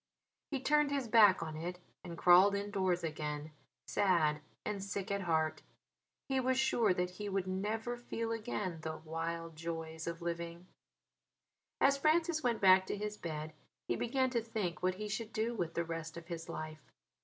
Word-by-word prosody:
He 275 Hz, -, -1 dB
turned 295 Hz, +2 st, +3 dB
his 280 Hz, -3 st, -1 dB
back 210 Hz, -6 st, +6 dB
on 155 Hz, -1 st, -5 dB
it 175 Hz, +3 st, -4 dB, 0.3 s
and 170 Hz, -1 st, -7 dB
crawled 185 Hz, +4 st, +7 dB
indoors 195 Hz, -3 st, 0 dB
again, 150 Hz, -1 st, -3 dB, 0.3 s
sad 160 Hz, -6 st, +2 dB, 0.2 s
and 205 Hz, -2 st, -2 dB
sick 200 Hz, 0 st, -3 dB
at 200 Hz, 0 st, 0 dB
heart. 160 Hz, -3 st, +1 dB, 0.7 s
He 265 Hz, -1 st, +1 dB
was 260 Hz, 0 st, +1 dB
sure 245 Hz, -5 st, +3 dB
that 180 Hz, 0 st, 0 dB
he 205 Hz, +3 st, -5 dB
would 195 Hz, -1 st, 0 dB
never 215 Hz, +6 st, -2 dB
feel 230 Hz, -1 st, -3 dB
again 210 Hz, -6 st, -3 dB
"the 160 Hz, 0 st, -4 dB
wild 165 Hz, +1 st, -4 dB
joys 160 Hz, 0 st, -5 dB
of 170 Hz, 0 st, -3 dB
living." 170 Hz, 0 st, -4 dB, 1.1 s
As 275 Hz, 0 st, +4 dB
Francis 315 Hz, +2 st, +3 dB
went 240 Hz, -4 st, 0 dB
back 190 Hz, -1 st, +7 dB
to -, -, -2 dB
his 210 Hz, +1 st, -3 dB
bed 155 Hz, -4 st, -5 dB, 0.3 s
he 120 Hz, -, +1 dB
began 260 Hz, -, +1 dB
to 235 Hz, -2 st, +1 dB
think 215 Hz, -6 st, -3 dB
what 185 Hz, 0 st, +1 dB
he 210 Hz, +2 st, -4 dB
should 220 Hz, +1 st, -3 dB
do 225 Hz, +2 st, -1 dB
with 175 Hz, -7 st, -3 dB
the 170 Hz, -, 0 dB
rest 165 Hz, -1 st, -5 dB
of 170 Hz, -, -8 dB
his 165 Hz, -1 st, -5 dB
life. 155 Hz, -1 st, -6 dB
185 Hz, 175 wpm, -34 LUFS, 165-225 Hz, 1.1 s, crawled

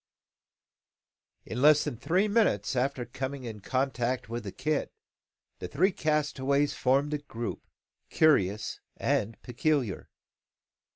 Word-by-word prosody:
In 125 Hz, -, -4 dB
less 150 Hz, +1 st, +6 dB
than -, -, -3 dB
three 180 Hz, -, +1 dB
minutes 200 Hz, -, +2 dB
after 130 Hz, 0 st, 0 dB
coming 130 Hz, +3 st, -5 dB
in 110 Hz, -3 st, -6 dB
contact 130 Hz, +1 st, -1 dB
with 120 Hz, -1 st, -4 dB
the 100 Hz, -, -4 dB
kit, 155 Hz, +6 st, -1 dB, 0.7 s
the -, -, -5 dB
three 185 Hz, -, +2 dB
castaways 145 Hz, -3 st, +1 dB
formed 140 Hz, +3 st, +1 dB
a 150 Hz, -, -1 dB
group, 120 Hz, -5 st, -6 dB, 0.4 s
curious 105 Hz, -10 st, +2 dB, 0.2 s
and 110 Hz, 0 st, 0 dB
peculiar. 125 Hz, -3 st, -1 dB
135 Hz, 115 wpm, -29 LUFS, 120-150 Hz, 0.7 s, less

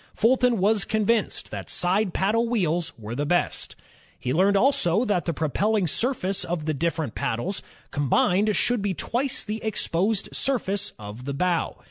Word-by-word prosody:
Fulton 245 Hz, +1 st, +3 dB
was 205 Hz, +2 st, +3 dB
convinced 215 Hz, +1 st, 0 dB
that -, -, -6 dB
side 190 Hz, +3 st, +2 dB
paddle 225 Hz, +6 st, +1 dB
wheels 175 Hz, -7 st, 0 dB
were 110 Hz, 0 st, -7 dB
the 140 Hz, +4 st, -1 dB
best. 175 Hz, +4 st, -1 dB, 0.4 s
He 125 Hz, -, -2 dB
learned 195 Hz, +5 st, +4 dB
also 235 Hz, -4 st, +3 dB
that 200 Hz, -6 st, 0 dB
the 170 Hz, -, 0 dB
propelling 190 Hz, +7 st, 0 dB
surface 200 Hz, -, 0 dB
of 165 Hz, -3 st, -3 dB
the 155 Hz, -, 0 dB
different 160 Hz, -3 st, -2 dB
paddles 160 Hz, -, -2 dB, 0.3 s
combined 180 Hz, +9 st, +2 dB
should 245 Hz, -3 st, +1 dB
be 200 Hz, -2 st, -1 dB
twice 255 Hz, +8 st, -2 dB
the 215 Hz, +1 st, -5 dB
exposed 200 Hz, -1 st, 0 dB
surface 205 Hz, -7 st, 0 dB
of 105 Hz, +3 st, -9 dB
the 140 Hz, 0 st, -3 dB
bow. 175 Hz, +2 st, 0 dB
195 Hz, 155 wpm, -25 LUFS, 165-220 Hz, 0.4 s, learned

